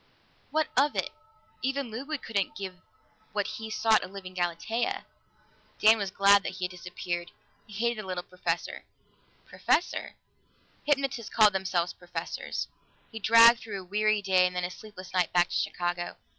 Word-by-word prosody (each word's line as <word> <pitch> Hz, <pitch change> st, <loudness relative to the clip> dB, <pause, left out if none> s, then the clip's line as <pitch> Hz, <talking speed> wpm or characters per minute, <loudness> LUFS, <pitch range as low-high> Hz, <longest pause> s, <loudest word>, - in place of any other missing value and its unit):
What 315 Hz, -1 st, +1 dB
of 285 Hz, +3 st, +3 dB
it? -, -, -1 dB, 0.5 s
Even 270 Hz, -2 st, -1 dB
Ludwig 275 Hz, +6 st, -5 dB
couldn't 200 Hz, -4 st, -1 dB
give 190 Hz, -1 st, -5 dB, 0.6 s
what 205 Hz, -1 st, 0 dB
he 220 Hz, 0 st, -6 dB
sought, 220 Hz, 0 st, +3 dB
a -, -, -5 dB
living 185 Hz, -1 st, -9 dB
Galatea. 220 Hz, -, -1 dB, 0.7 s
Dan 220 Hz, +1 st, +6 dB
was 200 Hz, -2 st, -1 dB
glad 200 Hz, +1 st, +5 dB
that 195 Hz, -, -4 dB
he 185 Hz, -1 st, -3 dB
had 180 Hz, -, -4 dB
disappeared; 175 Hz, -1 st, -5 dB, 0.4 s
he 210 Hz, -, -13 dB
hated 235 Hz, +2 st, 0 dB
the 190 Hz, -, -10 dB
little 180 Hz, -1 st, -3 dB
professor. 175 Hz, -2 st, -3 dB, 0.6 s
Professor? 350 Hz, -, 0 dB, 0.7 s
Hypnotists 275 Hz, -5 st, 0 dB
called 215 Hz, -2 st, +6 dB
themselves 185 Hz, -2 st, 0 dB
"professors." 175 Hz, 0 st, -5 dB, 0.4 s
He 225 Hz, -, -6 dB
dragged 230 Hz, +2 st, +7 dB
through 210 Hz, -4 st, -6 dB
a -, -, -9 dB
weary 210 Hz, +2 st, +1 dB
day 185 Hz, -2 st, +4 dB
and 180 Hz, -, -7 dB
then 180 Hz, -, -1 dB
a 180 Hz, -, -4 dB
sleepless 190 Hz, -3 st, -11 dB
night 180 Hz, -2 st, +2 dB
back 175 Hz, 0 st, +4 dB
to -, -, -4 dB
Chicago. 175 Hz, 0 st, -2 dB
200 Hz, 160 wpm, -28 LUFS, 180-225 Hz, 0.7 s, dragged